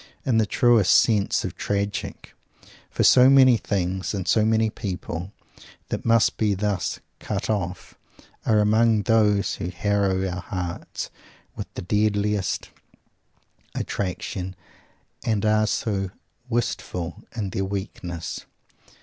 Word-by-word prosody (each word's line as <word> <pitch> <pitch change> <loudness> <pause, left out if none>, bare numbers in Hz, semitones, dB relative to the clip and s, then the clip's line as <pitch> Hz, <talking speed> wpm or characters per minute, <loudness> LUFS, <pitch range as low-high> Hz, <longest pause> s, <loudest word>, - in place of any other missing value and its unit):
In 120 -5 +3
the 110 - +2
truest 115 -3 +4
sense 105 -4 +3
tragic! 100 0 -3 0.6
For - - 0
so 125 +1 +7
many 130 -2 +7
things, 95 -3 -2
and 95 -2 -4
so 110 +5 +4
many 110 0 +2
people, 90 -3 -5 0.6
that - - -3
must 115 -1 +3
be 105 -2 +1
thus 100 -2 -1 0.2
"cut 105 +1 -2
off," 90 -4 -3 0.5
are 110 - +3
among 110 +1 +3
those 105 -2 +3
who 85 - -3
harrow 95 0 0
our 90 0 -4
hearts 90 -2 -5 0.4
with - - -7
the - - -5
deadliest 105 0 0 1.0
attraction 95 0 -3 0.7
and 110 -4 0
are 110 0 +3
so 100 -3 -1 0.4
wistful 90 -7 -2
in 105 -5 -3
their 95 - -1
weakness. 90 -4 -5
100 Hz, 115 wpm, -24 LUFS, 95-110 Hz, 1.0 s, so